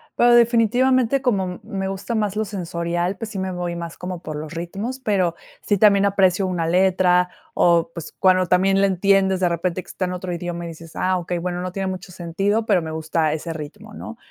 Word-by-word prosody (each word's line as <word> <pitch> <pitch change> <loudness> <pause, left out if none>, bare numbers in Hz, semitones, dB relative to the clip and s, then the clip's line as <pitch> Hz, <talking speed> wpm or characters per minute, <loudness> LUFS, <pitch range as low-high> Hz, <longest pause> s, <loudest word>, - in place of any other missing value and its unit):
pero, 240 0 +5
definitivamente, 245 +2 +3
como 190 -8 -1
me 195 -1 -4
gusta 195 +4 -4
más 210 -3 0
lo 215 - 0
sensorial, 175 -1 -2
pues, 225 - -6
sí, 200 - -4
me 190 0 -2
voy 175 -1 -3
más 170 -1 -6
como 180 -1 -6
por 155 -3 -6
los 155 +1 -6
ritmos, 195 +10 -5
pero 190 -8 0 0.3
sí, 205 - +1
también 200 0 +5
aprecio 195 -1 +3
una 175 -3 -1
letra, 180 0 +3 0.2
o, 170 -1 +3
pues, 170 -2 -8
cuando 185 -1 +4
también 195 +2 +3
la 200 - +4
entiendes, 190 0 +2
de 180 - +2
repente, 170 +2 -1
que - - -26
está 185 - -3
en 180 - -3
otro 180 0 -5
idioma 170 0 -4
y - - -5
dices: 165 0 -12
"Ah, 185 0 +1
okey, 175 0 -3
bueno, 175 +1 -3
no 180 0 -4
tiene 195 0 -3
mucho 185 0 -6
sentido, 195 +6 -1
pero 200 -5 +3
me 160 -1 -5
gusta 160 0 0
ese 160 +2 -4
ritmo", 180 +8 -9
¿no? 230 +2 -8
185 Hz, 215 wpm, -22 LUFS, 170-200 Hz, 0.3 s, pero